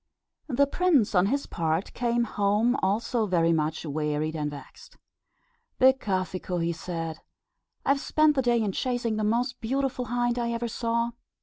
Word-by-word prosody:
The 280 0 +3
prince 285 - +2
on 185 0 +4
his 280 +6 0
part 165 +2 -2
came 240 -1 +1
home 210 +3 +1
also 220 +2 0
very 170 -3 +3
much 155 +1 -1
wearied 150 +1 -2
and 150 -1 -2
vexed. 145 - -12 0.8
"Becafico," 190 -8 +1
he 170 0 0
said, 165 -1 -5 0.7
"I - - 0
have 275 0 +4
spent 305 +1 +3
the 270 - +1
day 240 -2 +2
in 205 - 0
chasing 240 0 -1
the 215 - -1
most 245 +4 0
beautiful 260 +1 -1
hind 240 0 0
I 235 0 -1
ever 235 +1 -2
saw. 235 +1 -1
230 Hz, 160 wpm, -27 LUFS, 170-245 Hz, 0.8 s, on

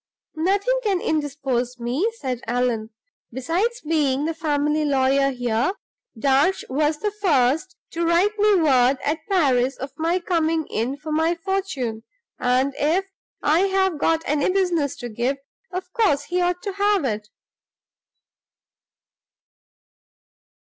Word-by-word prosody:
"Nothing 400 +9 +1
can 400 -6 +1
indispose 270 -6 -2
me," 255 - -1
said 255 - -4
Allan. 240 -2 0 0.4
"Besides 350 - -1
being 295 -3 +1
the 325 - -1
family 300 -1 0
lawyer 275 -1 +2
here, 245 +4 0 0.4
Darch 275 +9 +2
was 300 +3 +1
the 420 +5 -2
first 330 -3 +1 0.2
to 340 - -2
write 345 +5 +2
me 420 0 +5
word 270 -6 +4
at 310 +3 0
Paris 270 -8 +2
of 270 +2 -6
my 330 +3 +1
coming 330 -3 0
in 245 +5 -1
for 305 +1 -7
my 320 +2 +2
fortune; 335 - -3 0.4
and, 255 +2 +1
if 335 +7 +2 0.4
I 310 +3 +3
have 380 -4 +1
got 325 +1 +1
any 290 +2 +1
business 355 -7 +1
to 245 -3 -6
give, 240 +5 -1 0.3
of 365 0 -6
course 370 -12 +2
he 360 +4 -1
ought 355 0 0
to 400 -3 -3
have 400 -4 +2
it." 210 -3 -3
305 Hz, 130 wpm, -23 LUFS, 265-365 Hz, 0.4 s, me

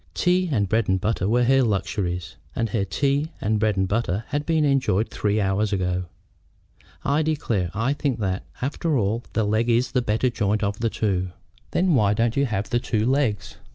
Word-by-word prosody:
Tea 180 0 +2
and 105 -7 +1
bread 110 +1 +1
and 95 0 +2
butter 105 -1 0
were 120 +2 +3
her 135 +2 +4
luxuries, 90 -5 -1 0.2
and 115 -2 -1
her 100 0 0
tea 140 - 0
and 105 +1 0
bread 105 -2 +1
and 95 0 +1
butter 105 -1 -1
had 145 0 -2
been 160 -2 +2
enjoyed 130 -7 +1
three 105 0 0
hours 100 +1 +1
ago. 90 -2 -1 1.0
"I 145 +3 +2
declare 120 - -1
I 115 +6 +1
think 140 -4 -1
that, 95 -2 -1 0.2
after 150 +2 0
all, 110 +2 0
the 110 - +1
leg 110 +3 +1
is 120 +2 +2
the 125 - +1
better 120 +2 +1
joint 105 -1 0
of 100 +1 -1
the 115 0 +1
two." 95 -5 -1 0.4
"Then 180 -1 +2
why 105 -6 +3
don't 115 +1 +1
you 140 0 +2
have 100 -3 -3
the 120 - +2
two 110 -3 -1
legs?" 130 -6 0
110 Hz, 195 wpm, -24 LUFS, 100-135 Hz, 1.0 s, her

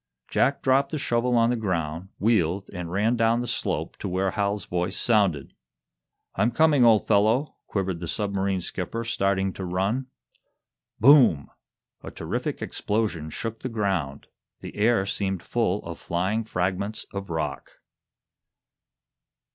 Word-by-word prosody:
Jack 140 - +1
dropped 135 +1 +3
the 155 - -3
shovel 120 -2 +1
on 115 +1 +4
the - - +1
ground, 90 -5 -3
wheeled, 100 -4 +1
and 90 -2 -5
ran 105 +6 +2
down 115 0 +2
the 120 - -2
slope - - -2
to - - -4
where 95 +1 0
Hal's 100 -1 -1
voice 90 +2 -2
sounded. 100 - +1 0.8
"I'm 115 - +2
coming, 150 -1 +4
old 110 -3 +5
fellow!" 110 +7 +2
quivered 95 -4 -2
the 85 - -5
submarine 100 -1 -1
skipper, 95 +6 -4
starting 100 -4 0
to 95 - -6
run. 95 +9 -1 0.9
Boom! 120 - +6 0.5
A - - -7
terrific - - -4
explosion 105 -8 -2
shook 115 +7 -5
the 130 - -4
ground. 95 - -2 0.4
The - - -8
air 110 -1 +2
seemed 95 -2 -2
full 105 -4 -1
of 85 -1 -7
flying 95 +6 -1
fragments 95 +2 -2
of 100 -1 -5
rock. 80 -4 -4
100 Hz, 140 wpm, -25 LUFS, 90-115 Hz, 0.9 s, Boom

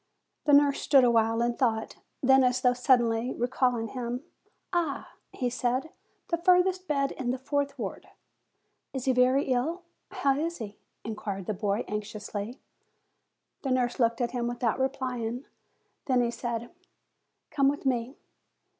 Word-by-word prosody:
The 295 - +4
nurse 285 -1 +5
stood 275 -3 +5
awhile 230 -1 +3
in 240 0 +1
thought; 225 -4 0 0.3
then, 265 0 +6
as 250 0 +2
though 250 -1 +4
suddenly 245 -1 +2
recalling 245 -2 0
him; 250 +1 -4 0.5
"Ah!" 330 -5 -1 0.2
he 250 - -2
said, 250 +4 -1 0.4
"the 335 - +1
furthest 365 +1 +3
bed 275 -2 +1
in 255 -2 -4
the 255 - 0
fourth 280 +1 -2
ward." 210 -6 -5 0.9
"Is 265 -2 -4
he 260 - +3
very 255 +3 +4
ill? 305 +8 0 0.3
How 275 0 +1
is 335 +2 -2
he?" 210 -3 -8 0.2
inquired 205 -3 -5
the 215 - -1
boy, 205 +2 -1
anxiously. 210 +2 -5 1.0
The 270 - -3
nurse 250 -1 +1
looked 230 0 +2
at 240 - 0
him, 240 -2 -2
without 240 -1 -1
replying. 255 -2 -2 0.6
Then 255 -2 +3
he 235 - 0
said, 235 -1 -4 0.8
"Come 280 -3 +3
with 290 0 -4
me." 250 0 -1
250 Hz, 145 wpm, -28 LUFS, 235-275 Hz, 1.0 s, then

